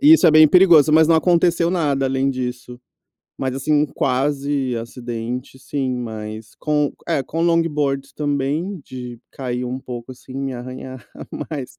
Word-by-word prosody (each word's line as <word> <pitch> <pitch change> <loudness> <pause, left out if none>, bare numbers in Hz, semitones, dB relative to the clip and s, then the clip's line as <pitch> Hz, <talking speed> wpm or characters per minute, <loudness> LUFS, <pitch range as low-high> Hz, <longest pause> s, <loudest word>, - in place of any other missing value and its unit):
E 295 +2 +7
isso 185 - +4
é - - +7
bem 155 0 +8
perigoso, 165 -5 +6
mas 160 0 +6
não 165 - +5
aconteceu 170 0 +3
nada 145 -6 0
além 135 +1 +1
disso. 125 -1 -5 0.6
Mas, 130 -1 -2
assim, 135 +3 -1
um 150 0 +3
quase 135 0 -1
acidente 120 +2 -6
sim, 135 -3 -2
mas 110 -2 -7
com, 150 -1 0 0.2
eh, 135 - +1
com 165 +5 -4
longboards 150 -5 0
também 150 +6 -2
de 125 -2 -8
cair 125 -2 -4
um 125 +1 -4
pouco, 125 -1 -8
assim, 130 +1 -14
me 135 -1 -3
arranhar, 130 +1 -8 0.4
mas 140 -5 -6
135 Hz, 160 wpm, -20 LUFS, 125-155 Hz, 0.6 s, bem